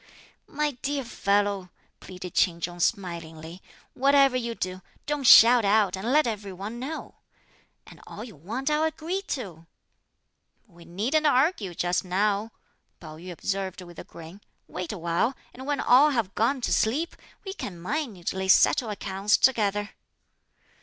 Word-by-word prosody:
"My 300 0 -1
dear 280 0 -2
fellow," 200 -4 0 0.3
pleaded 180 -1 -9
Ch'in 170 -3 +2
Chung 175 +1 -5
smilingly, 170 -3 -3 0.3
"whatever 275 0 +4
you 235 -2 -2
do 185 -1 -4 0.2
don't 295 -2 -2
shout 235 +1 +9
out 200 -2 +3
and 205 +6 -3
let 305 +2 +4
every 210 -4 -4
one 200 +6 -7
know; 295 +6 -7 0.7
and - - -15
all - - -8
you 230 -5 -11
want, 230 - -4
I'll 300 +1 +2
agree 320 +4 -2
to." 175 - -6 1.0
"We 170 -6 -18
needn't 240 - 0
argue 255 - +1
just 175 +1 0
now," 200 +4 0 0.5
Pao 155 -2 -10
yü 180 +3 -9
observed 190 +1 -4
with 175 -2 -12
a - - -7
grin; 170 +4 -12 0.3
"wait 180 -1 -5
a 210 - -6
while, 170 +9 0 0.2
and 260 +2 -10
when 290 -1 -1
all 270 +5 +5
have 230 -9 -1
gone 250 +5 0
to - - 0
sleep, 285 +10 0 0.3
we 385 - -5
can 190 - -7
minutely 190 - -3
settle 220 +4 +4
accounts 200 0 0
together." 205 -5 +1
205 Hz, 150 wpm, -26 LUFS, 180-260 Hz, 1.0 s, shout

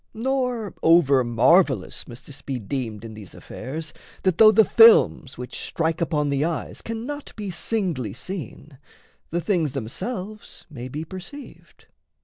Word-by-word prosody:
Nor 250 -3 -1
over 140 -6 +5
marvellous 130 - +2
must 120 0 -11
this 145 0 -10
be 135 -2 -4
deemed 115 -2 -4
In 110 - -8
these 105 -3 -11
affairs 155 +4 -7 0.3
that, 185 -3 +1
though 215 -1 +9
the 220 0 +5
films 225 - +5
which 125 0 -6
strike 160 0 -1
Upon 150 -3 0
the 140 +1 +1
eyes 165 0 -3
cannot 245 +6 -6
be 205 -3 -5
singly 175 - -2
seen, 150 - -8 0.5
The 175 +1 -1
things 165 -8 0
themselves 190 - -6
may 125 -3 -7
be 150 +5 -5
perceived. 195 - -11
160 Hz, 140 wpm, -24 LUFS, 130-210 Hz, 0.5 s, though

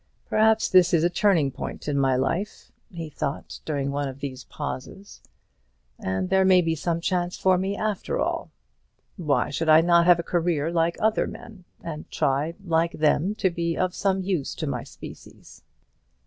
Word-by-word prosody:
"Perhaps 220 0 +3
this 180 -2 +5
is 160 - +2
a 175 - +2
turning 175 -9 +2
point - - -7
in 145 - 0
my 135 -2 +2
life," 165 +11 -2 0.2
he 165 -3 -6
thought 150 -1 -5
during 140 -3 -2
one 140 0 -2
of 135 0 -8
these 135 -2 -6
pauses; 150 +7 -7 0.8
"and 95 - -2
there 190 0 +4
may 190 -1 +6
be 165 -2 +1
some 165 +2 -2
chance 175 0 -1
for 190 -1 +3
me 190 +2 -2
after 215 -3 -2
all. - - -2 0.7
Why 150 -8 0
should 160 +3 -1
I 155 +1 +8
not 170 0 +4
have 175 -1 +7
a 170 - -3
career 165 -3 0
like 170 0 +1
other 220 0 +1
men, 205 -6 -11 0.2
and 155 -2 -7
try 150 +2 0
like 165 0 +1
them 155 +6 +1
to 190 -3 +1
be 170 -1 -2
of 185 -1 0
some 190 -1 0
use 180 -7 -2
to - - -4
my - - -3
species? - - -13
170 Hz, 175 wpm, -25 LUFS, 150-185 Hz, 0.8 s, I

